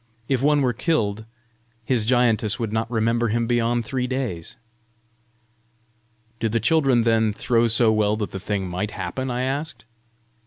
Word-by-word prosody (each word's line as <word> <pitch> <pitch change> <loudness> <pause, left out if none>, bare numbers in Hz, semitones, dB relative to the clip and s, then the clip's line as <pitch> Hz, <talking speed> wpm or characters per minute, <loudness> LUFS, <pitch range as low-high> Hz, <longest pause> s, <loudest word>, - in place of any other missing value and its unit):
If 130 -3 0
one 145 +1 +3
were 125 -2 +1
killed, 110 -6 -1 0.6
his 120 -3 +1
giantess 115 -4 +2
would 110 -2 -3
not 110 +1 -1
remember 115 0 +1
him 115 +2 0
beyond 120 0 0
three 125 +1 -2
days!" 115 -6 -4 1.8
"Do 115 - 0
the 115 +2 0
children 130 -1 +3
then 110 -1 +2
throw 115 +2 +1
so 115 0 +3
well 105 -1 +1
that 105 -2 -3
the 95 - -5
thing 100 0 -3
MIGHT 90 +4 -3
happen?" 130 +5 -4
I 125 +1 -2
asked. 135 -3 -3
115 Hz, 155 wpm, -23 LUFS, 110-125 Hz, 1.8 s, one